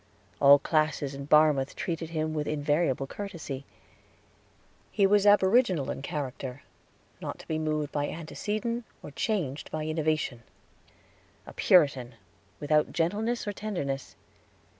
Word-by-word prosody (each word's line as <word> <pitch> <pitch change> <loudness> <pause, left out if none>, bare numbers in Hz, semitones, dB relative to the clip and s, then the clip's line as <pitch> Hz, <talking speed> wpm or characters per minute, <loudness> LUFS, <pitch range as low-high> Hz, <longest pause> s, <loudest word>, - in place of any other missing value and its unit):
All 140 0 +8
classes 155 -2 0
in 140 0 -7
Barmouth 150 -3 +4
treated 165 -2 -3
him 155 -1 -2
with 150 -1 -2
invariable 145 -2 0
courtesy. 155 -6 -7 1.3
He 200 -1 +3
was 205 +1 +4
aboriginal 195 - +4
in - - -6
character, 135 -2 -5 0.6
not - - -5
to - - -14
be 160 -1 -1
moved 155 -1 -1
by 145 0 -1
antecedent 215 +8 -3 0.2
or - - -8
changed 155 - -2
by 155 -1 -4
innovation 155 -5 -1 1.0
a - - -11
Puritan, 135 -8 +3 0.4
without 150 +1 +2
gentleness 210 +8 -1
or 205 - -2
tenderness. 175 -11 -4
155 Hz, 120 wpm, -28 LUFS, 140-190 Hz, 1.3 s, All